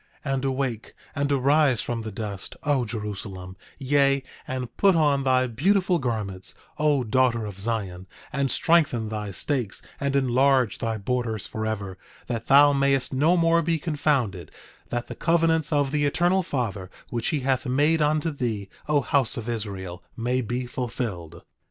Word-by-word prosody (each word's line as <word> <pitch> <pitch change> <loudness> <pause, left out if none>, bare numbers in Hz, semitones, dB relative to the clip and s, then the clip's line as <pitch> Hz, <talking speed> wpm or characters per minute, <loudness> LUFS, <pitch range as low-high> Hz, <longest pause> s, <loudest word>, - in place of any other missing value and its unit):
10:31 135 - 0
And 135 0 -1
awake, 130 -4 -2 0.2
and 140 -1 -1
arise 140 -1 +3
from 120 -1 -2
the 110 -1 -6
dust, 100 -1 -6
O 145 -4 +1
Jerusalem; 100 -4 -6 0.2
yea, 140 0 +2 0.2
and 125 -2 -4
put 195 -2 +4
on 145 -4 +3
thy 130 -1 +3
beautiful 180 - +2
garments, 105 -7 -3 0.2
O 150 -3 +3
daughter 120 0 +2
of 100 -2 -8
Zion; 100 -4 -3 0.3
and 140 -1 0
strengthen 135 -7 +2
thy 105 -1 -4
stakes 120 +2 -2 0.2
and 140 0 -1
enlarge 130 -2 +3
thy 115 -1 -2
borders 110 0 -2
forever, 105 -4 -4 0.3
that 115 -2 -4
thou 145 +1 +7
mayest 140 -2 +1
no 155 +7 +3
more 165 0 +4
be 165 0 +1
confounded, 140 - -1 0.4
that 120 0 -2
the - - -7
covenants 165 -2 +2
of 145 -2 +2
the 145 -1 +1
Eternal 175 +6 +2
Father 110 - -3 0.2
which 120 -1 -2
he 150 -3 0
hath 130 -1 0
made 150 +5 +3
unto 155 +2 +1
thee, 115 -8 -3 0.2
O 150 -1 +3
house 140 -5 +1
of 115 -1 -5
Israel, 100 -6 -5 0.2
may 125 +2 0
be 125 +2 -3
fulfilled. 115 -9 -5
130 Hz, 160 wpm, -25 LUFS, 110-145 Hz, 0.4 s, thou